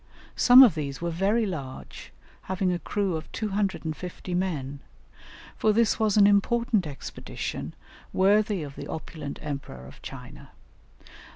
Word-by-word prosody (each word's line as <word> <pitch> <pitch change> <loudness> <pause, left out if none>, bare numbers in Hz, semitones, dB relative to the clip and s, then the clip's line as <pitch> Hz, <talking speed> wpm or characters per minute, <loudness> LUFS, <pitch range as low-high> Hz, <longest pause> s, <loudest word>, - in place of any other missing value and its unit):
Some 255 +2 +9
of 235 -9 +6
these 140 -3 -4
were 170 0 -2
very 200 +7 +1
large, 140 -9 -7 0.4
having 185 -1 0
a 175 - -2
crew 195 -1 -1
of 160 - -7
250 185 -4 -3
men, 150 -7 -2 0.8
for 215 - +2
this 230 0 +2
was 215 -2 +2
an 205 - +7
important 205 -1 +2
expedition 140 -2 -6 0.4
worthy 205 -1 +2
of 140 -2 -8
the - - -7
opulent 155 -2 -6
Emperor 140 - -6
of - - -14
China. - - -11
185 Hz, 130 wpm, -26 LUFS, 155-210 Hz, 0.8 s, Some